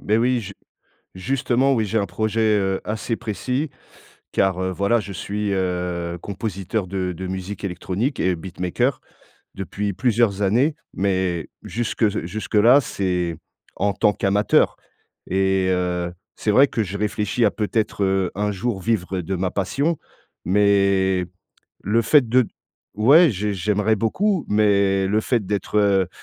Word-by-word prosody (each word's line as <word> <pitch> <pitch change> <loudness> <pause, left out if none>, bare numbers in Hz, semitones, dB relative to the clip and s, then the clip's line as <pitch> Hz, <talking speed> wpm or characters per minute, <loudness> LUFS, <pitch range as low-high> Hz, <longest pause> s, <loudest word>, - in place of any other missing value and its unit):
Beh 105 +2 +1
oui 125 +1 +2
ju 100 -2 -8 0.6
justement 130 +5 +1
oui, 110 -2 +1
j'ai 110 +3 0
un 100 - 0
projet, 110 +4 -2 0.2
heu, 95 -1 0
assez 110 +2 -2
précis 130 +7 -3 0.6
car 95 -1 +1
heu, 95 0 -1
voilà 100 +5 +1
je 100 -1 -7
suis, 100 +3 -3
heu, 90 -2 -2
compositeur 100 -1 -3
de 90 -1 -2
de 95 +2 -6
musique 95 +2 -5
électronique 100 +7 -2
et 90 -1 +1
beatmaker, 95 - -2 0.5
depuis 100 +1 -3
plusieurs 110 -2 +1
années, 125 +10 +2 0.2
mais 95 -4 -1
jusque 120 0 -3
s 105 -1 +2
jusque 105 +4 -5
là 120 +6 +7
c'est 90 - -2 0.4
en 100 0 0
tant 105 +2 +2
qu'amateur 100 +2 +2 0.5
et 95 0 +1
heu, 90 -1 -1 0.2
c'est 105 - 0
vrai 135 +6 +6
que 115 - -2
je 100 +1 -5
réfléchis 105 +2 0
à 105 - +3
peut-être, 105 -1 -1
heu, 95 -1 +1
un 105 +1 0
jour 105 +1 -2
vivre 95 -3 -1
de 95 +3 -3
ma 90 0 -1
passion, 140 - 0 0.5
mais 95 -1 +3 0.6
le 115 +4 +2
fait 140 -4 +4
de 125 0 +4 0.5
ouais 140 - +6
j'ai 105 +1 -2
j'aimerais 105 +3 +1
beaucoup 180 - 0
mais 100 -2 +3
le 105 +2 +2
fait 115 -2 0
d'être, 100 +1 -2
heu 100 -3 +3
100 Hz, 150 wpm, -22 LUFS, 95-110 Hz, 0.6 s, là